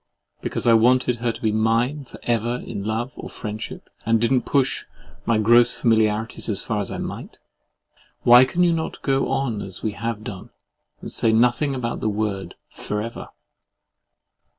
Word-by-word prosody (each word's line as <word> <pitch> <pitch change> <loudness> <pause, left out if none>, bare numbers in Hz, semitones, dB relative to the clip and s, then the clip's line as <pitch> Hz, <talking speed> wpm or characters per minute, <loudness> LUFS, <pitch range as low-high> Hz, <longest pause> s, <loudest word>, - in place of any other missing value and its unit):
Because - - -3
I 115 - +6
wanted 125 +2 +4
her 120 0 0
to - - -11
be 110 - +2
mine 115 +6 +1
for - - -13
ever 120 0 0
in 105 -4 -6
love 115 +4 -2
or - - -7
friendship, 105 0 -7 0.2
and 115 +1 +2
did 115 +2 +1
not 130 -2 +2
push 135 -2 +1 0.4
my 115 - +3
gross 120 +2 +5
familiarities 110 -1 +1
as 100 -3 -2
far 110 -2 -2
as 100 - -4
I - - -4
might. - - -6 0.9
"Why 120 +1 +8
can 170 +7 +1
you 175 -1 +4
not 160 -1 -3
go 135 -1 +1
on 120 -6 -1
as 95 -2 -8
we 110 - 0
have 110 +1 -4
done, 100 -4 -8 0.5
and - - -6
say 115 - +2
nothing 125 +5 +2
about 120 -2 -3
the 110 - 0
word, 105 -2 -3 0.2
FOREVER?" 105 +3 -5
115 Hz, 175 wpm, -23 LUFS, 110-125 Hz, 0.9 s, Why